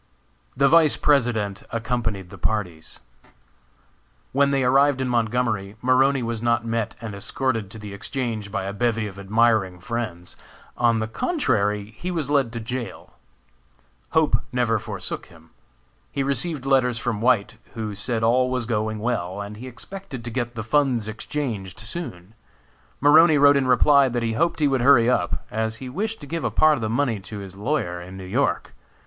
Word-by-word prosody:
The 140 +1 +5
Vice 155 0 +5
President 115 -8 +1
accompanied 115 -5 -2
the 100 - -11
parties. 90 -6 -3 1.3
When 140 +1 +3
they 135 -1 +1
arrived 135 +2 +4
in 130 - -1
Montgomery, 115 -4 0
Maroney 130 +2 +3
was 115 -1 -3
not 120 -1 +1
met 115 -1 -2
and 115 -3 -6
escorted 115 +1 -2
to 110 - -10
the 105 -2 -8
Exchange 110 -1 -4
by 100 -2 -2
a 100 +1 -4
bevy 115 0 0
of 100 -1 -8
admiring 100 -2 +2
friends. 95 -5 -5 0.4
On 120 -1 +3
the 110 0 -1
contrary, 105 - 0
he 180 - -5
was 160 -5 -2
led 135 -5 +2
to 115 - -3
jail. 120 +2 -6 1.0
Hope 155 -7 +3
never 120 -3 +1
forsook - - -6
him. - - -19 0.6
He 140 - -1
received 140 +1 -2
letters 130 -3 +3
from 115 -2 -2
White, 115 -2 +2 0.2
who 110 -2 -4
said 110 +3 -3
all 125 +3 +3
was 125 -2 -1
going 110 -1 -1
well, 105 -5 -2
and 100 +1 -6
he 125 +4 -8
expected 130 +1 -8
to 120 - -5
get 120 0 -3
the 110 - -4
funds 125 -2 +1
exchanged 110 -4 -4
soon. 110 - -7 0.7
Maroney 155 +2 +6
wrote 145 0 +6
in 135 -2 +2
reply 140 +2 +5
that 120 -1 -2
he 115 -1 0
hoped 165 +5 0
he 150 - +4
would 135 -2 +1
hurry 120 -3 +6
up, 90 -8 -1
as 110 +1 -1
he 130 +2 -8
wished 215 - -3
to - - -8
give 165 +3 -4
a - - +1
part 155 0 +4
of 140 - -2
the 110 - -1
money 120 -2 0
to 105 +2 -9
his 95 -2 -8
lawyer 100 -6 -2
in 90 +2 -10
New 95 - -8
York. 90 - 0
115 Hz, 175 wpm, -23 LUFS, 105-135 Hz, 1.3 s, Maroney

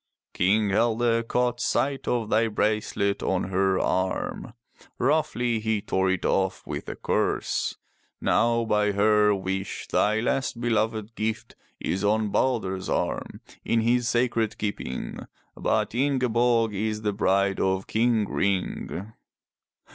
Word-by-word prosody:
King 105 +3 +2
Helge 115 +2 +2
caught 125 0 0
sight 135 +1 0
of 115 -3 -1
thy 115 +1 +3
bracelet 105 -2 0
on 95 0 -1
her 95 0 +2
arm. 95 +4 -1 0.4
Roughly 125 -5 +1
he 110 -1 0
tore 95 -1 0
it 95 -1 -1
off 95 -1 0
with - - -5
a - - -5
curse. - - -1 0.4
Now 115 0 +2
by 105 -1 +2
her 105 0 +4
wish 95 0 -4
thy 105 +1 +2
last 125 +1 -1
beloved 110 -2 -1
gift 110 0 -3 0.2
is 95 +2 -2
on 105 +1 +2
Balder's 95 -6 0
arm, - - -2 0.2
in 115 - +1
his 120 +1 +2
sacred 120 -2 0
keeping, 100 -11 -4 0.4
but - - 0
Ingeborg 120 -4 +2
is 110 +2 -2
the 105 -1 0
bride 100 -1 +1
of 95 0 0
King 110 -2 +1
Ring.'' 100 +1 -2
110 Hz, 125 wpm, -26 LUFS, 100-115 Hz, 0.4 s, her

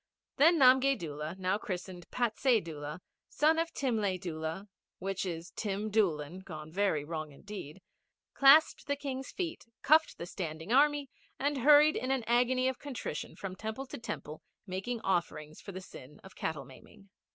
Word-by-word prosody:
Then 330 +4 +6
Namgay 265 0 +6
Doola, 155 0 -5
new 190 +2 0
christened 180 -2 -6
Patsay 240 0 +2
Doola, 150 -2 -7 0.3
son 310 +4 +3
of 330 0 -1
Timlay 215 -8 0
Doola, 165 +3 -5 0.3
which 195 0 -3
is 170 0 -5
Tim 210 0 -3
Doolan 175 -5 +1
gone 155 -5 -9
very 190 -5 +1
wrong 155 -1 -5
indeed, 190 +1 -9 0.5
clasped 285 +4 +6
the 285 - +1
King's 270 -2 -5
feet, 335 -9 -4 0.2
cuffed 315 +2 +4
the 170 - -5
standing 165 +2 -4
Army, 290 0 +3 0.3
and 285 0 0
hurried 300 +3 +7
in 255 - -2
an 265 -2 +1
agony 250 +2 +3
of 260 -1 -2
contrition 280 -4 -5
from 190 -2 -6
temple 220 +6 -5
to 260 - -8
temple, 155 -9 -6 0.2
making 205 +5 -4
offerings 155 -5 -2
for 200 - -8
the 185 0 -7
sin 145 -5 -12
of 190 - -13
cattle 150 -4 -3
maiming. 195 +9 -16
200 Hz, 160 wpm, -31 LUFS, 170-265 Hz, 0.5 s, hurried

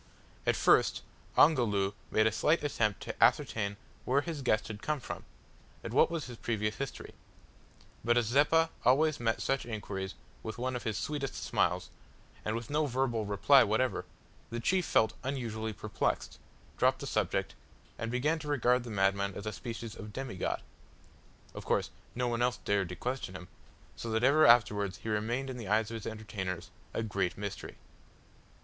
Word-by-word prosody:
At - - +4
first - - +4 0.3
Ongoloo 105 -10 +4 0.2
made 110 - +3
a 110 - +4
slight 150 +9 +2
attempt 110 -8 0
to - - -1
ascertain 100 -2 +2 0.3
where 135 +3 +2
his 155 -1 -5
guest 110 -4 +1
had 105 -1 -7
come 150 -1 -1
from, 125 - -7 0.6
and - - -5
what - - +5
was 165 -2 -3
his 120 -2 -8
previous 105 -2 -1
history, 140 - -5 0.9
but 120 +2 +3
as 120 - +3
Zeppa 150 +7 +4
always 150 +4 +4
met 115 -1 0
such 135 0 0
inquiries 100 -4 -5 0.3
with 110 -2 -6
one 130 +1 -2
of 125 - -5
his 110 -2 -1
sweetest 145 -3 -3
smiles, - - 0 0.5
and 110 - -1
with 115 +1 -5
no 150 0 +2
verbal 120 -4 0
reply 130 +7 +6
whatever, 110 -2 0 0.4
the 120 +1 -3
chief 180 +9 +1
felt 110 0 +3
unusually 115 -5 -3
perplexed, 100 - -2 0.4
dropped - - +4
the - - -6
subject, - - 0 0.5
and 115 - -2
began 150 +6 +1
to 150 - -8
regard 125 -3 +2
the 120 - -8
madman 100 -1 +1
as 100 - -6
a 110 - -3
species 115 +4 -6
of 105 -1 -8
demigod. 120 -7 -3 0.9
Of - - -7
course - - 0 0.2
no 125 0 0
one 120 0 -1
else 125 0 +2
dared 100 -3 +1
to 90 - -5
question 125 -6 -4
him, 90 -1 -9 0.5
so 115 - -5
that 110 +1 0
ever 150 +4 +6
afterwards 105 -5 +4
he 110 - -3
remained 120 +5 -1
in 125 - -6
the 115 -5 -6
eyes 110 +2 +2
of - - -4
his 110 - -5
entertainers 105 -5 -5 0.2
as - - -2
a - - -2
"Great 100 -4 -1
Mystery." 100 -1 -5
115 Hz, 175 wpm, -31 LUFS, 105-130 Hz, 0.9 s, reply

